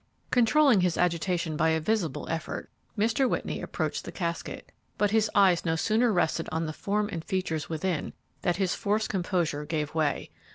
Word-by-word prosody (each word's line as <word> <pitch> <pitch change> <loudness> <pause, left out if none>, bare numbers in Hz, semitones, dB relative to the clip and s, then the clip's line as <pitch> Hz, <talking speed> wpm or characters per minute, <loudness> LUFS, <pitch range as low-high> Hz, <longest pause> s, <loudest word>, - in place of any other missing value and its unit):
Controlling 250 -2 +5
his 180 -2 +1
agitation 170 -1 0
by 160 +2 +2
a 160 0 +2
visible 170 -4 -1
effort, 165 0 -4 0.3
Mr. 230 +5 +2
Whitney - - -2
approached - - -3
the - - -7
casket, 170 -2 -4 0.3
but 205 -1 +2
his 220 -1 +3
eyes 190 -4 +5
no 165 -1 +1
sooner 225 +7 +2
rested 165 -3 0
on 160 +1 -1
the 155 - -4
form 205 +5 -1
and 165 -3 -4
features 175 -5 -2
within 165 0 -2 0.3
than 175 - +1
his 190 -1 0
forced 210 +2 0
composure 175 -6 -1
gave 150 -1 -2
way. 155 -3 0
180 Hz, 170 wpm, -28 LUFS, 160-210 Hz, 0.3 s, Controlling